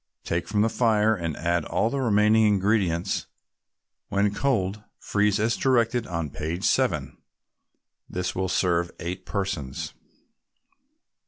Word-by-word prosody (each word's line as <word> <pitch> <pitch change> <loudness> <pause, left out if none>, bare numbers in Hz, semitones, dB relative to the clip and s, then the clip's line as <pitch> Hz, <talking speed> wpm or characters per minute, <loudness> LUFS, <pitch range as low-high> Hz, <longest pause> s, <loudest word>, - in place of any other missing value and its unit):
Take 85 0 -2
from 105 0 +2
the - - +3
fire, 110 -2 +3
and 85 -5 -4
add 85 +1 0
all 115 - 0
the 140 - -1
remaining 110 -1 +4
ingredients. 100 -3 +1 0.8
When 100 0 +1
cold, 105 -5 0
freeze 105 0 +1
as 110 +2 +1
directed 120 -2 +1
on 85 -5 -3
page 80 +4 -4
7. - - +1 0.9
This 90 0 -2
will 95 0 -2
serve 85 -2 +1
eight 90 +2 -5
persons. 95 -10 -3
100 Hz, 120 wpm, -25 LUFS, 85-110 Hz, 0.9 s, remaining